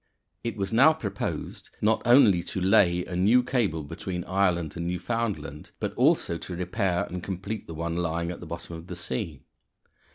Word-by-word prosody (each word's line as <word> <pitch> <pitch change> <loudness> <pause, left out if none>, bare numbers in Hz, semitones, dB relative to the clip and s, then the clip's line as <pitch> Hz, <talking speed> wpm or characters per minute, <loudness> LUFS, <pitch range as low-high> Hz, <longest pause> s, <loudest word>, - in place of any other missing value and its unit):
It 115 -2 -3
was 100 +2 -2
now 140 +7 +7
proposed 100 -10 -5
not 110 +1 +2
only 115 -7 +6
to 90 - -4
lay 90 -1 +4
a 90 - -6
new 110 +8 +4
cable 110 - 0
between 90 +4 -5
Ireland 90 -5 0
and 85 0 -3
Newfoundland, 100 -4 -3
but - - -2
also 85 - +2
to 90 - -6
repair 90 0 0
and 90 0 -5
complete 100 +3 -5
the 80 - -7
one 85 +1 -2
lying 85 0 -1
at 90 - -7
the 85 - -9
bottom 85 0 -7
of 80 +1 -10
the 90 - -6
sea. 75 -3 -4
90 Hz, 175 wpm, -27 LUFS, 85-105 Hz, -, now